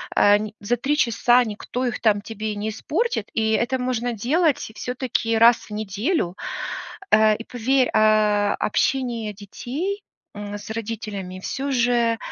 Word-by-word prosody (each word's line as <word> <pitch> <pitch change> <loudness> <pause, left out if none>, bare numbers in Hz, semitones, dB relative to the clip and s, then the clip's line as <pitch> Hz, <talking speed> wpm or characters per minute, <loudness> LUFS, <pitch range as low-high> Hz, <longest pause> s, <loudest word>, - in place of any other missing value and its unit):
ань 205 +1 +4
за 215 +4 0
3 285 +5 0
часа 240 0 +4
никто 230 +4 -4
их 240 - -3
там 210 -3 +3
тебе 215 0 -4
не 205 +1 -3
испортит, 290 - -2
и 220 -1 +1
это 250 +4 +1
можно 245 -1 -1
делать 290 - +2 0.2
всё-таки 245 -3 -1
раз 230 +1 +7
в - - -15
неделю. 210 - -1 0.8
А, 215 0 +6
и 225 - -7
поверь, 255 +2 +1
а, 215 -1 +3
общение 235 -2 0
детей, 280 - -5 0.3
м, 205 0 -6
с 205 0 -11
родителями 210 -4 -5
всё 275 +7 -3
же, 240 -2 +2
225 Hz, 140 wpm, -23 LUFS, 210-250 Hz, 0.8 s, раз